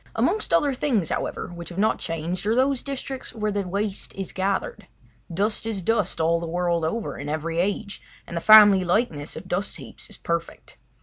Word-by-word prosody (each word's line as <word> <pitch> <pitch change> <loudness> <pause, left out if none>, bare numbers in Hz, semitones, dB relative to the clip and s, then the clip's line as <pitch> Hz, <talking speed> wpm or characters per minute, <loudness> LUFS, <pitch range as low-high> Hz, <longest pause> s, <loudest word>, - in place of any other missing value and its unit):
Amongst 435 - +1
other 285 -2 +3
things, 245 - 0
however, - - -3
which 170 -1 -7
have 175 - -9
not 215 +3 +2
changed 170 +4 -3
are 220 - +2
those 265 0 +2
districts 270 -2 -6
where 215 -1 -1
the 200 -2 -2
waste 200 +2 -3
is 195 -1 -5
gathered. 195 - -2 0.4
Dust 210 +5 -1
is 205 -5 -3
dust 210 -2 0
all 165 +1 +2
the 170 - -5
world 170 0 0
over, 215 +8 -3
in 145 +1 -5
every 160 +2 -2
age, 200 +2 -2 0.2
and 170 - -8
the 170 - -2
family 205 -2 +8
likeness 175 -6 0
of 185 - -8
dust 185 +3 -2
heaps - - -11
is - - -11
perfect. - - -4
195 Hz, 190 wpm, -24 LUFS, 170-220 Hz, 0.4 s, family